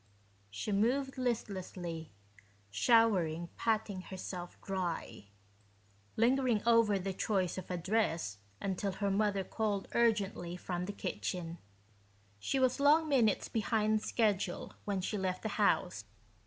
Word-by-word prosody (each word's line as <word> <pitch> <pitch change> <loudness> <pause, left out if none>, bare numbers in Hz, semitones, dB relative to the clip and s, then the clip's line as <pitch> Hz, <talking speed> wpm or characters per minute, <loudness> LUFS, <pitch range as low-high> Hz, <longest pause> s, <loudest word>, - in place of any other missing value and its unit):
She 105 - -4
moved 260 +7 +1
listlessly, 185 - -3 0.6
showering 175 - +3
patting 215 -4 0
herself 185 -1 -7
dry, 180 - -3 0.9
lingering 240 -2 +3
over 230 -3 +5
the 190 0 -3
choice 185 -2 0
of - - -10
a 180 - -1
dress 170 - 0 0.2
until 195 0 -2
her 200 +1 -1
mother 200 -1 +1
called 205 0 -2
urgently 200 -6 +1
from 180 0 -3
the 205 - -3
kitchen. 175 -4 -4 0.8
She 270 - -1
was 255 +1 +2
long 305 +3 +5
minutes 235 -8 +3
behind 215 -1 +1
schedule 205 -6 0
when 200 -2 -1
she 205 +3 -2
left 185 -1 -2
the 220 - -1
house. - - +1
200 Hz, 120 wpm, -33 LUFS, 180-225 Hz, 0.9 s, over